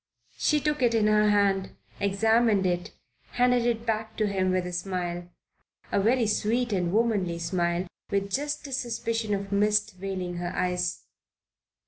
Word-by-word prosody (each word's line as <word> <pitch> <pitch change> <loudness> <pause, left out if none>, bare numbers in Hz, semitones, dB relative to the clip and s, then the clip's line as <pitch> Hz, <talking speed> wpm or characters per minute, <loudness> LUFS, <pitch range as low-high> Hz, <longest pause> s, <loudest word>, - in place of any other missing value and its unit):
She 300 - +3
took 300 -1 -1
it 235 -2 +3
in 220 -2 +3
her 210 0 +4
hand, 200 -2 +2 0.2
examined 215 +1 +3
it, 175 -1 -1 0.4
handed 245 -1 +3
it 230 -1 -1
back 220 -1 -2
to 215 - +2
him 190 -2 0
with 185 -1 +1
a 180 - -5
smile, 175 -1 -3 0.6
a - - +2
very 235 +3 +3
sweet 225 +2 0
and 180 -3 0
womanly 205 -6 +1
smile, 170 +1 -1 0.2
with 200 0 -1
just 290 +5 -2
the 280 - -8
suspicion 230 -4 -1
of 195 0 -5
mist 210 0 +1
veiling 185 -2 -4
her 175 0 -3
eyes. 180 -1 -1
205 Hz, 155 wpm, -27 LUFS, 185-230 Hz, 0.6 s, her